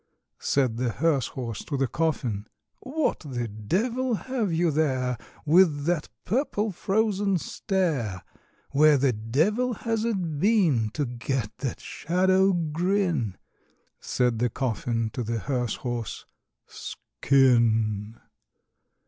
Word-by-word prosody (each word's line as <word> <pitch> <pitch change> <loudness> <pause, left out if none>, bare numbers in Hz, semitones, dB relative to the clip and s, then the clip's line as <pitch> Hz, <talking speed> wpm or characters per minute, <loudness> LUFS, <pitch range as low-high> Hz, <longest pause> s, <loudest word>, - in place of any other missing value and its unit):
Said 130 -5 +1
the 125 0 0
hearse 140 0 +1
horse 115 -5 -5
to 145 - -2
the 135 - +2
coffin, 125 -10 -1 0.3
"What 300 +3 -1
the 125 -6 -4
devil 225 - -1
have 235 -4 -2
you 165 0 +2
there, 130 -5 +1 0.3
With 155 -3 +4
that 170 -2 0 0.2
purple 220 -2 0
frozen 200 +1 +1
stare? 150 - -1 0.5
Where 150 +1 +5
the 135 -1 +2
devil 165 - +1
has 225 0 -1
it 180 -10 -1
been 170 - +3
To 150 - 0
get 120 -2 -3
that 130 - -3
shadow 185 +4 +2
grin?" 170 - 0 0.6
Said 125 -3 0
the 120 +1 +2
coffin 115 -2 -1
to 125 - -3
the 115 +1 -2
hearse 120 0 -1
horse, 120 -3 -4 0.4
"Skin!" 115 -5 +1
145 Hz, 115 wpm, -26 LUFS, 120-190 Hz, 0.6 s, Where